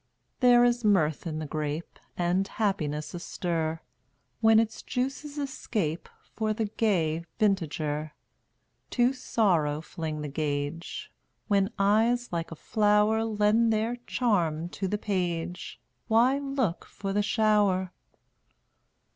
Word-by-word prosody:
199 250 - +5
There 240 0 +7
is 240 0 0
mirth 170 -7 +2
in 155 -1 -3
the 155 - -4
grape 150 +2 -4 0.2
And 180 +2 +1
happiness 155 -9 -2
astir 165 -2 -2 0.6
When 225 -1 +6
its 225 -1 -1
juices 270 +3 -3
escape 215 - -3 0.3
For 215 -1 0
the 220 +1 -1
gay 175 -7 0
vintager. 155 -7 0 0.8
To 245 +1 +2
Sorrow 175 - +1
fling 155 -1 -5
the 150 - -4
gage; 145 +2 -3 0.4
When 200 -2 +2
eyes 220 +3 +2
like 170 -1 -2
a 165 - -7
flower 210 +4 +2
Lend 220 +1 +2
their 225 +3 0
charm 175 -9 0
to 190 +2 -3
the 210 - -1
page 180 -4 -3 0.3
Why 245 +5 +4
look 275 -10 -1
for 195 -1 -5
the 205 - +2
shower? 205 -4 +2
200 Hz, 120 wpm, -28 LUFS, 165-225 Hz, 0.8 s, There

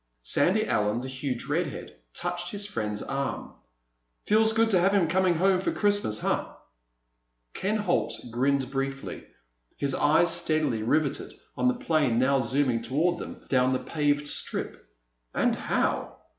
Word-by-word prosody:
Sandy - - +2
Allen, 105 +3 0
the 130 - -6
huge 130 -1 -4
redhead, - - -3 0.2
touched 175 0 -2
his 205 +1 -2
friend's 105 - -3
arm. 135 0 -4 0.7
"Feels 220 +1 +4
good 225 0 +2
to 185 - +5
have 195 +3 +3
him 190 -5 +3
coming 185 +1 +2
home 185 +2 +3
for - - 0
Christmas, 205 - +1
huh?" - - -1 1.0
Ken 210 +3 -1
Holt 205 -4 0 0.2
grinned 135 +2 0
briefly, 135 0 -4 0.5
his 140 -1 0
eyes 165 +5 +3
steadily 150 -8 0
riveted 140 +5 0 0.2
on - - +1
the 255 - +3
plane 155 - +1
now 135 +2 +3
zooming 130 -1 +1
toward 170 +6 0
them - - -9
down 130 -1 +2
the - - +2
paved 145 0 0
strip. 105 - -3 0.5
"And - - +2
how!" - - -1
145 Hz, 145 wpm, -27 LUFS, 130-185 Hz, 1.0 s, to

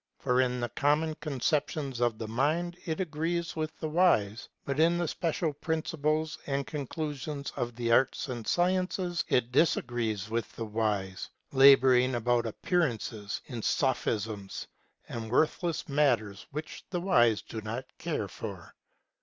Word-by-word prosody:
For 125 -1 +2
in 125 -1 0
the 120 0 -2
common 150 +5 +1
conceptions 145 -1 -1
of 120 -2 +1
the 110 - -5
mind 155 +9 0
it 160 -1 -2
agrees 170 0 -2
with 155 -1 -3
the 155 - -3
wise; 130 - +2 0.2
but 140 +1 -2
in 170 +2 +4
the 175 -1 0
special 165 -1 -1
principles 155 0 -1
and 140 -1 -1
conclusions 145 -1 -4
of 120 -1 -3
the 120 -1 -1
arts 130 +4 +3
and 120 -4 -5
sciences 180 0 +1
it 125 -1 +1
disagrees 120 -7 +1
with 115 +1 -2
the 115 - -4
wise, 105 -3 -2 0.2
laboring 130 -2 +6
about 120 0 +1
appearances, 115 - -1
in 120 -5 -6
sophisms 110 -6 -1 0.4
and 115 -1 -5
worthless 160 - +1
matters 120 -9 +1
which 150 +2 -6
the 180 - -1
wise 120 - +4
do 110 - -6
not 115 +5 -4
care - - -2
for. - - -8
135 Hz, 140 wpm, -30 LUFS, 115-155 Hz, 0.4 s, laboring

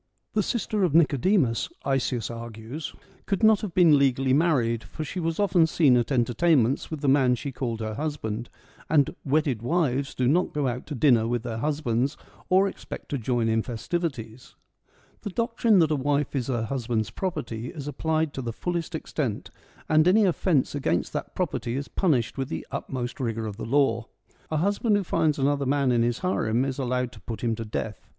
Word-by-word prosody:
The 215 - +2
sister 215 -1 -1
of 165 -5 +1
Nicodemus, 150 - +3 0.2
Isaeus 130 -4 0
argues, 115 +5 -7 0.3
could 195 +1 -1
not 220 -2 +6
have 195 -6 -5
been 165 -5 +6
legally 135 -1 +2
married, 130 -7 +2
for 155 - -6
she 170 +5 -5
was 165 0 -2
often 185 -5 +4
seen 150 -5 +4
at 120 +2 +1
entertainments 125 +2 +2
with 155 -3 -5
the 145 - -1
man 135 -2 +4
she 140 +3 -5
called 120 -3 -3
her 110 0 -3
husband, 120 -5 -4 0.4
and 145 -3 +3
' - - -46
wedded 140 -5 +1
wives 140 -1 0
do 125 - +1
not 170 +6 +2
go 145 -2 +1
out 125 0 -4
to 150 - -5
dinner 120 -4 +4
with 120 -1 -1
their 115 -2 -4
husbands, 140 -1 0 0.3
or 190 +2 +5
expect - - -8
to 140 - -2
join 120 0 0
in 110 0 +2
festivities.' 125 -2 -4 0.7
The - - -4
doctrine 230 0 +2
that 160 -3 +4
a - - +3
wife 145 +1 0
is 125 -4 -1
her 120 -4 -1
husband's 115 -3 -2
property 120 - -4
is 145 -2 -7
applied 155 +1 -1
to 135 - -4
the 120 -2 -3
fullest 170 +6 -3
extent, 135 -8 -3 0.4
and 155 +1 +4
any 210 +3 +5
offence 175 -5 +1
against 90 - -1
that - - -5
property 120 0 -2
is 140 - -4
punished 140 - 0
with 135 0 -2
the - - -4
utmost 125 -1 -4
rigour 115 -3 -2
of 105 -2 -6
the - - -5
law. 120 -3 +2 0.4
A 155 - -1
husband 205 +5 +2
who 200 - -1
finds 160 -4 +1
another 140 0 +1
man 140 -1 +2
in 120 -1 +3
his 120 0 +1
harem 120 -8 +1
is 135 0 -3
allowed 125 -1 -1
to - - -14
put 115 - -6
him 115 -1 +1
to 115 0 -5
death. 105 -2 -5
135 Hz, 195 wpm, -26 LUFS, 120-160 Hz, 0.7 s, not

